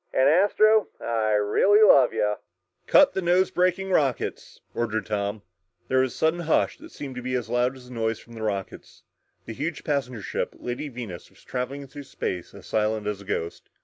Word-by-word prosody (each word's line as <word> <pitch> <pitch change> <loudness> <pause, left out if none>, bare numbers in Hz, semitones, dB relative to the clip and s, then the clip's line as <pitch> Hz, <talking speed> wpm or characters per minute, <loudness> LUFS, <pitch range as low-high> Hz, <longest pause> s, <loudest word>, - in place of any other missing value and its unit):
"And, 130 - +3
Astro, 205 +6 +4
I 110 -2 0
really 150 - +4
love 135 - +7
ya!" 105 0 0 0.5
"Cut 290 - +6
nose 185 0 +2
braking 185 +2 +1
rockets!" 140 -8 -1
ordered 110 -2 -2
Tom. 105 -1 -3 0.5
There 130 - +3
was 130 -1 +2
a - - -10
sudden 160 +2 +1
hush 165 -2 +1
that - - -12
seemed 140 -2 -7
to - - -4
be 130 +1 -2
as 120 -3 -3
loud 125 +2 +1
as 125 -1 -14
the 125 - -11
noise 115 -1 -2
of 120 - -13
the 110 - -8
rockets. 100 -3 -5 0.4
The - - -6
huge 145 +5 -4
passenger 130 -7 -2
ship, - - -3
Lady 125 +5 -5
Venus, 115 -9 -8
was - - -22
traveling 130 +3 -4
through 140 +2 -10
space 90 -8 -5
as - - -12
silent 110 0 0
as 105 -1 -3
a - - -13
ghost. 85 -4 -4
125 Hz, 190 wpm, -25 LUFS, 110-150 Hz, 0.5 s, love